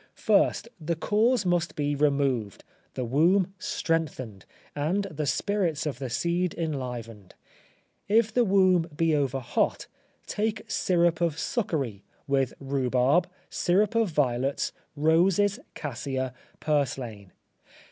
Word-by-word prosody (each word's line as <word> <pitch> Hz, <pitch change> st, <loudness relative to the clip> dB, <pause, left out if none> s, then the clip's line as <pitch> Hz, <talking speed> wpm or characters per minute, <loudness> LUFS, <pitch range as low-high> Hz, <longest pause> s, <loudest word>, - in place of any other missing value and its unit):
First, -, -, +2 dB
the 165 Hz, +1 st, -2 dB
cause 215 Hz, +5 st, +2 dB
must 175 Hz, -1 st, 0 dB
be 145 Hz, -1 st, 0 dB
removed, 140 Hz, -7 st, 0 dB, 0.3 s
the 130 Hz, -, -2 dB
womb 175 Hz, +9 st, +3 dB
strengthened, 155 Hz, -, -2 dB, 0.3 s
and 160 Hz, +8 st, 0 dB
the 150 Hz, -1 st, -3 dB
spirits 175 Hz, -4 st, 0 dB
of 140 Hz, -5 st, -3 dB
the 130 Hz, -2 st, -4 dB
seed 170 Hz, +8 st, 0 dB
enlivened. 125 Hz, -, -5 dB, 0.7 s
If 220 Hz, +1 st, +3 dB
the 245 Hz, -, +4 dB
womb 185 Hz, -4 st, +4 dB
be 165 Hz, -1 st, +3 dB
over 135 Hz, -2 st, 0 dB
hot, 125 Hz, -, -1 dB, 0.4 s
take 215 Hz, 0 st, -2 dB
syrup 175 Hz, -2 st, +1 dB
of 165 Hz, -3 st, +1 dB
succory, 145 Hz, -, -2 dB, 0.2 s
with 135 Hz, -3 st, 0 dB
rhubarb, 135 Hz, +4 st, +1 dB, 0.2 s
syrup 195 Hz, +4 st, +1 dB
of 230 Hz, -3 st, +2 dB
violets, 135 Hz, -3 st, 0 dB, 0.2 s
roses, 180 Hz, -, +3 dB, 0.2 s
cassia, 130 Hz, -2 st, -3 dB, 0.3 s
purslain. 125 Hz, -9 st, -2 dB
155 Hz, 115 wpm, -27 LUFS, 130-185 Hz, 0.7 s, the